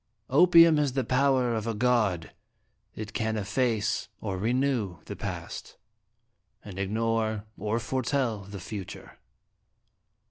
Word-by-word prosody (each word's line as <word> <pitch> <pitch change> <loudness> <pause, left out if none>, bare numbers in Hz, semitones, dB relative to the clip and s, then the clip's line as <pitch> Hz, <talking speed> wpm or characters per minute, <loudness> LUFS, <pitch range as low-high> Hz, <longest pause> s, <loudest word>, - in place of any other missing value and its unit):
" 105 - -46
Opium 170 -3 +7
has 145 -3 +1
the 135 -1 0
power 130 -2 +2
of 110 0 -2
a 115 - -1
god; 105 -8 +1 0.6
it 110 0 -7
can 110 -1 -1
efface 110 +1 0
or 100 -3 -3
renew 120 -4 0
the - - -6
Past, - - -6 0.9
and 95 -2 -8
ignore 110 +1 -1
or 110 +1 -1
foretell 125 -1 -1
the 100 0 -8
Future." 95 +1 -8
115 Hz, 120 wpm, -28 LUFS, 105-130 Hz, 0.9 s, Opium